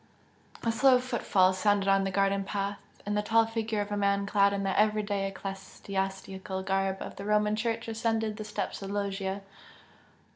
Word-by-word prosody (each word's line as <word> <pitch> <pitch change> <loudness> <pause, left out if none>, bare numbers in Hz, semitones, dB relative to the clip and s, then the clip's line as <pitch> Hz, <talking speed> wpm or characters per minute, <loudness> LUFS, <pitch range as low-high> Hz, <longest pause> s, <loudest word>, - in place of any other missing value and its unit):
A 230 - +2
slow 255 +2 +5
footfall 220 -7 +2
sounded 200 +1 +2
on 195 0 +4
the - - 0
garden 195 +1 +1
path, 200 0 -3 0.3
and 205 0 -1
the 210 - +2
tall 225 +2 +3
figure 225 -1 -2
of 205 0 -5
a 205 - -1
man 200 0 +1
clad 200 0 +3
in 200 0 -2
the 195 -1 0
everyday 210 -2 +1
ecclesiastical 195 0 -5
garb 195 0 0
of - - -9
the 195 - -6
Roman 210 0 +2
Church 230 +1 -2
ascended 225 -1 -1
the 215 - -5
steps 210 -1 -4
of 195 - -5
the 200 - -4
loggia. 195 -1 -2
200 Hz, 180 wpm, -29 LUFS, 195-215 Hz, 0.3 s, slow